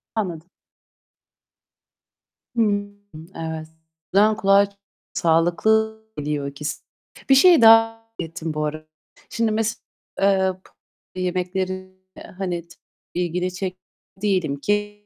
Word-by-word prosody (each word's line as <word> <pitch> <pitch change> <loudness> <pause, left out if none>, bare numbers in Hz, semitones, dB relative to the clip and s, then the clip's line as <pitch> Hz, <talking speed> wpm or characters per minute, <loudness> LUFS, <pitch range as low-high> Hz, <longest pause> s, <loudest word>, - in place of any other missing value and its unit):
Anladım. 175 -5 -3 2.1
Hımm, 205 -2 0 0.4
evet. 160 -1 -5 0.5
O - - +2
zaman 215 +1 +5
kulağa 200 -1 +5 0.5
sağlıklı 220 +7 +2 0.2
geliyor 145 -1 -2
ikisi. 140 +2 -5 0.5
Bir 270 - +7
şeyi 340 +1 +7
daha 225 0 +9 0.3
merak 165 - -4
ettim 165 -2 -5
bu 150 0 -1
arada. 155 +1 -5 0.4
Şimdi 230 -1 0
mesela, 220 +1 -1 0.4
eee, 190 -1 +3 0.6
pı - - -7
yemeklerine, 185 +1 -2 0.5
hani, 180 -3 -3 0.5
ilgini 180 +1 -1
çeken 185 0 -4 0.4
değilim 185 -8 +1
ki 205 +3 -2
185 Hz, 105 wpm, -22 LUFS, 165-210 Hz, 2.1 s, daha